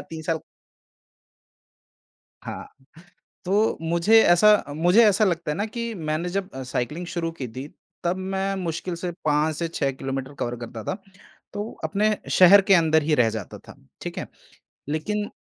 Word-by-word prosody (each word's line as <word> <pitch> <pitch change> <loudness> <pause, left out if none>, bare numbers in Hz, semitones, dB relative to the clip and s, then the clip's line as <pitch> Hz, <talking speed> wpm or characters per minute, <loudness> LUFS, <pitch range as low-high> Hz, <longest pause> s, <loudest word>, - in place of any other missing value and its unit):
3 160 -1 -6
साल 160 +1 -1 2.0
हाँ, - - -7 0.8
तो 205 +4 +2
मुझे 170 +7 +4
ऐसा 210 +4 +5
मुझे 175 +8 +5
ऐसा 210 +1 +4
लगता 170 -5 -1
है - - -2
ना 205 - 0
कि 235 +1 -4
मैंने 160 0 -2
जब 190 +1 -3
साइक्लिंग 140 +7 -3
शुरू 170 -1 -3
की 140 -6 -6
थी 130 +3 -6 0.4
तब 175 +2 0
मैं 190 +1 -2
मुश्किल 175 -1 -3
से 175 +1 -4
5 150 +1 +2
से 170 +2 -2
6 140 -4 -1
किलोमीटर 135 +1 -5
कवर 120 0 -2
करता 115 -2 -7
था, - - -3 0.6
तो 205 +2 -4
अपने 210 +1 +1
शहर 190 +2 +8
के - - +8
अंदर 160 -2 +3
ही 150 0 +2
रह 120 -4 +3
जाता 110 0 -6
था, - - -14 0.3
ठीक - - -6
है? - - -4 0.6
लेकिन 205 +8 -2
170 Hz, 160 wpm, -24 LUFS, 155-195 Hz, 2.0 s, शहर